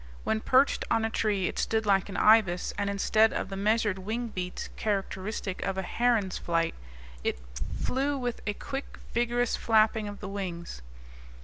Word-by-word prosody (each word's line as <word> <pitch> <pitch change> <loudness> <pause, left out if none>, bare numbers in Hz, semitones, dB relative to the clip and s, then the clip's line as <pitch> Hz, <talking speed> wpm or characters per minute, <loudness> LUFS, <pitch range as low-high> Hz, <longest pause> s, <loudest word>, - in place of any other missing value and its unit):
When 220 - +1
perched 260 +4 +3
on 225 -1 +2
a 225 - -2
tree 205 -5 +1
it - - -4
stood 220 -1 +1
like 195 -1 +3
an 200 - -4
ibis; 210 -5 +4
and 205 -1 -1
instead 215 +2 +3
of - - -3
the 195 - -5
measured 210 -1 +1
wing 225 +5 -3
beats 180 -3 -5
characteristic 195 -1 -2
of 190 -1 -2
a 190 - -1
heron's 225 -3 +1
flight, 165 -1 0 0.5
it - - 0 0.4
flew 280 +2 0
with 245 -3 -3
a 210 - 0
quick, 270 +5 -6 0.2
vigorous 240 0 +1
flapping 220 -1 +3
of 205 0 -7
the 205 - -6
wings. 180 - -5
210 Hz, 170 wpm, -29 LUFS, 190-225 Hz, 0.5 s, ibis